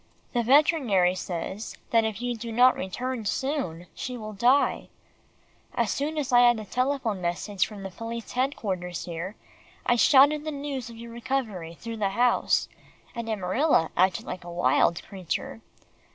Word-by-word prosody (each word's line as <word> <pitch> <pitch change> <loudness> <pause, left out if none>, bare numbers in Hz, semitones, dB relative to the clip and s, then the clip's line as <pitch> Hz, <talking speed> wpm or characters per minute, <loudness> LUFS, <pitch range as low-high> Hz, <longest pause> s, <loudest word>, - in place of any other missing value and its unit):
The 240 - +2
veterinary 245 - +4
says 185 +3 -5
that 230 -1 +4
if 220 +1 -3
you 245 -1 -1
do 230 +1 -6
not 250 +3 +5
return 245 +6 -4
soon, 210 - -2
she 250 -1 -5
will 215 -2 -7
die. 245 +7 +2 0.9
As - - +1
soon 300 +3 -2
as 285 -4 -2
I 245 - +7
had 240 -1 +6
the 215 - -6
telephone 250 -4 -1
message 180 +3 -1
from 200 -3 -7
police 230 +3 -6
headquarters 195 -9 -2
here, 175 +4 -5 0.5
I 240 - +3
shouted 290 +4 +6
the 310 - -3
news 280 -4 -4
of 230 - -11
your 235 0 -9
recovery 225 -9 -3
through 230 +5 -7
the 205 -2 +1
house, 240 +5 +2 0.5
and 235 -2 -5
Amarilla 200 - +1
acted 185 0 +2
like 185 - -6
a 175 - -9
wild 170 -1 +2
creature. 190 +3 -5
230 Hz, 155 wpm, -26 LUFS, 190-255 Hz, 0.9 s, I